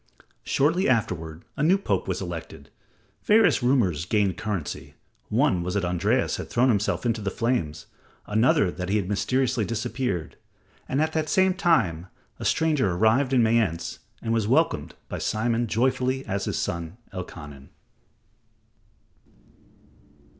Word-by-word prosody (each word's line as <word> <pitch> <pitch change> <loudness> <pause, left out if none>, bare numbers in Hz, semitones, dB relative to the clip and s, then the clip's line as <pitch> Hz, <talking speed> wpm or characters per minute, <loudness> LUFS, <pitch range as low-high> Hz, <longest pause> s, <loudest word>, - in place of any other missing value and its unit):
Shortly 160 +5 +2
afterward, 85 -9 -1
a - - -4
new 175 +6 +4
Pope 195 - -1
was - - -2
elected. - - -8 0.5
Various 215 - +5
rumors 110 - +2
gained 100 -1 +1
currency. 100 -8 -5 0.3
One 90 - +2
was 90 +3 -3
that 100 -2 +1
Andreas 90 -1 +1
had - - -6
thrown 125 +2 +3
himself 105 +1 0
into 115 -2 0
the 100 - -1
flames; 95 - -2 0.4
another 105 -3 +3
that 90 0 -5
he 105 - +2
had 100 -4 -2
mysteriously 120 +4 0
disappeared. 110 -4 -3 0.5
And 140 +4 +2
at 160 0 -2
the 155 -1 0
same 190 +3 +3
time 115 - +1 0.3
a - - -5
stranger 155 -9 +2
arrived 110 +9 +3
in 125 -3 +4
Mayence 110 -7 0 0.2
and 115 0 0
was 110 -3 +1
welcomed 115 - +1
by - - -5
Simon 115 +2 0
joyfully 130 +3 0
as 100 +1 -2
his - - -2
son, 85 +2 -3 0.2
Elkanan. 75 -6 -8
110 Hz, 140 wpm, -25 LUFS, 90-130 Hz, 0.5 s, Various